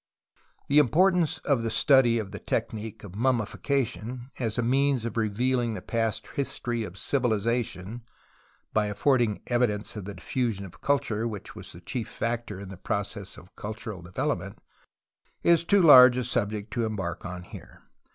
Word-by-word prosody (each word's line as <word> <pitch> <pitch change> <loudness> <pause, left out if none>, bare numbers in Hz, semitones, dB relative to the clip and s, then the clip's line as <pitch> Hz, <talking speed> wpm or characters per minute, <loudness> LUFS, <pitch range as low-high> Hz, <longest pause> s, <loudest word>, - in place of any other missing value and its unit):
The 145 +2 +5
importance 170 - +3
of 140 -5 +2
the 115 - -1
study 130 -2 +4
of 105 -4 -4
the 105 - -7
technique 110 -1 -3
of 100 -3 -9
mummification 125 +1 -1
as 115 -3 -1
a 120 - +1
means 135 0 +2
of 115 - -4
revealing 115 +2 0
the - - -6
past 115 -2 -1
history 120 -4 -2
of 95 -3 -8
civilization 115 -3 -1 0.7
(by 105 -1 +2
affording 115 +1 +1
evi 120 0 +2
dence 105 +1 -4
of 105 -3 -6
the 100 0 -7
diffusion 105 +2 -2
of 95 - -14
culture 115 -6 0
which 105 -5 -7
was - - -8
the 85 - -12
chief 115 +6 -4
factor 115 -4 -3
in 100 -1 -8
the 95 - -9
process 100 +1 -4
of 90 - -16
cultural 105 -2 -6
development) 90 +1 -3 0.9
is 170 -1 +5
too 195 +2 +4
large 125 -5 +9
a 125 - 0
subject 105 -3 -2
to 120 - 0
embark 95 -5 -4
on 90 -1 -6
here. - - -13
115 Hz, 160 wpm, -27 LUFS, 105-125 Hz, 0.9 s, large